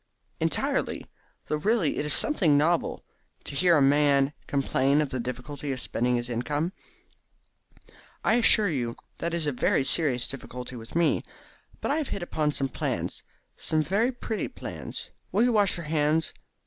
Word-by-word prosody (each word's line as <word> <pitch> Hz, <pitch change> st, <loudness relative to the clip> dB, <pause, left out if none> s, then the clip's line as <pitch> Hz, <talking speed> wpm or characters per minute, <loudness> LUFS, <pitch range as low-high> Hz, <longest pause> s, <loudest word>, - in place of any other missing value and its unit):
"Entirely; -, -, 0 dB, 0.4 s
though 150 Hz, -, -1 dB
really 195 Hz, -1 st, +1 dB
it -, -, -1 dB
is 150 Hz, -, +3 dB
something 170 Hz, -, +3 dB
novel 165 Hz, +3 st, +1 dB, 0.4 s
to -, -, -8 dB
hear 170 Hz, +3 st, +4 dB
a 140 Hz, -, +4 dB
man 140 Hz, 0 st, +4 dB
complain 140 Hz, 0 st, +2 dB
of 150 Hz, -2 st, +1 dB
the 130 Hz, -, -3 dB
difficulty 125 Hz, +4 st, -5 dB
of 130 Hz, -, -3 dB
spending 125 Hz, +1 st, 0 dB
his 120 Hz, 0 st, -2 dB
income." 145 Hz, +8 st, -2 dB, 1.5 s
"I -, -, +3 dB
assure 225 Hz, -2 st, +5 dB
you 125 Hz, -8 st, -2 dB, 0.2 s
that 170 Hz, -, -2 dB
it -, -, 0 dB
is 165 Hz, -, -1 dB
a 145 Hz, -, +1 dB
very 130 Hz, +1 st, +1 dB
serious 135 Hz, -5 st, +4 dB
difficulty 125 Hz, -1 st, -6 dB
with 115 Hz, +2 st, -10 dB
me. 170 Hz, -1 st, +3 dB, 0.6 s
But -, -, -1 dB
I 295 Hz, -, +2 dB
have 310 Hz, -4 st, -1 dB
hit 195 Hz, -, -4 dB
upon 155 Hz, -3 st, 0 dB
some 135 Hz, -2 st, 0 dB
plans -, -, -3 dB, 0.3 s
some 155 Hz, -1 st, 0 dB
very 200 Hz, -, +1 dB
pretty 230 Hz, -3 st, -3 dB
plans. -, -, -7 dB, 0.2 s
Will 215 Hz, -, +3 dB
you 245 Hz, -1 st, +3 dB
wash 205 Hz, -4 st, +3 dB
your 170 Hz, -, -6 dB
hands? 155 Hz, +1 st, +1 dB
150 Hz, 170 wpm, -27 LUFS, 135-175 Hz, 1.5 s, assure